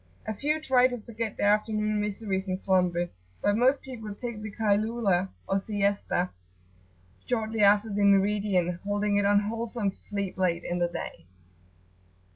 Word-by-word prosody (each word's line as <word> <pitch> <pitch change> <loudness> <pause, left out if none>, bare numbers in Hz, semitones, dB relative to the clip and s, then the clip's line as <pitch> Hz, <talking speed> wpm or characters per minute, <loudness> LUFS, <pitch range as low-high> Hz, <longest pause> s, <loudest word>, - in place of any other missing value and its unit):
A 220 - -2
few 300 +8 0
try 255 -4 +4
to 250 -1 -4
forget 225 0 -5
their 205 0 +4
afternoon 215 0 0
miseries 200 -2 -2
in 185 0 -1
slumber, 180 -2 +1 0.3
but 205 - +2
most 255 +5 +3
people 225 -6 -7
take 235 -1 -6
the 215 -1 -6
Kaylulah, 205 -3 +1 0.2
or 195 - +1
Siesta, 200 -3 0 1.0
shortly 225 -2 -1
after 205 +1 +4
the 205 0 +1
meridian, 195 -3 +2
holding 205 0 0
it 205 - +2
unwholesome 210 +1 +1
to - - -16
sleep 200 -2 -4
late 175 -2 +1
in 175 0 -2
the 175 - +2
day. 85 - -7
205 Hz, 150 wpm, -28 LUFS, 195-220 Hz, 1.0 s, try